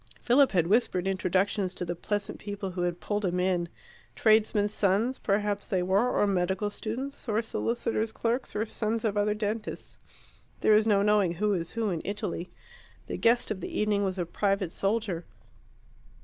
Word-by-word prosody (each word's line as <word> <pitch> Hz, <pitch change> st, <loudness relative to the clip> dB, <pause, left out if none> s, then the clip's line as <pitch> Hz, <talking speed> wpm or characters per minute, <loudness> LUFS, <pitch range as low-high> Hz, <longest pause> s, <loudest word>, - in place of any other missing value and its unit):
Philip 260 Hz, +1 st, +4 dB
had 175 Hz, -3 st, +3 dB
whispered 190 Hz, -2 st, +2 dB
introductions 190 Hz, +1 st, 0 dB
to 180 Hz, -, -3 dB
the 175 Hz, 0 st, -3 dB
pleasant 205 Hz, +3 st, -3 dB
people 200 Hz, -2 st, -5 dB
who 180 Hz, 0 st, -4 dB
had 175 Hz, 0 st, -1 dB
pulled 205 Hz, 0 st, -2 dB
him 180 Hz, -1 st, 0 dB
in 180 Hz, -2 st, +1 dB, 0.5 s
tradesmen's 215 Hz, -1 st, +3 dB
sons 210 Hz, +7 st, +1 dB
perhaps 205 Hz, 0 st, 0 dB
they 185 Hz, -2 st, 0 dB
were, 195 Hz, +7 st, +2 dB
or -, -, +2 dB
medical 190 Hz, +1 st, 0 dB
students, 250 Hz, +6 st, -5 dB
or 215 Hz, 0 st, +2 dB
solicitors' 225 Hz, -1 st, -1 dB
clerks, 235 Hz, +3 st, -2 dB
or 215 Hz, +2 st, 0 dB
sons 225 Hz, +1 st, -2 dB
of 210 Hz, -2 st, 0 dB
other 210 Hz, 0 st, +1 dB
dentists. 215 Hz, 0 st, -4 dB, 0.6 s
There 215 Hz, -, +5 dB
is 215 Hz, +1 st, +3 dB
no 200 Hz, -2 st, +4 dB
knowing 205 Hz, -4 st, +3 dB
who 210 Hz, +3 st, +1 dB
is 170 Hz, -3 st, -2 dB
who 225 Hz, -3 st, 0 dB
in 165 Hz, -3 st, -2 dB
Italy. 200 Hz, -4 st, -4 dB, 0.6 s
The -, -, -4 dB
guest 235 Hz, 0 st, +2 dB
of 190 Hz, -3 st, -3 dB
the -, -, -4 dB
evening 210 Hz, -1 st, +2 dB
was 190 Hz, -1 st, -1 dB
a 175 Hz, -, -1 dB
private 195 Hz, 0 st, 0 dB
soldier. 195 Hz, -4 st, -1 dB
205 Hz, 175 wpm, -28 LUFS, 185-220 Hz, 0.6 s, There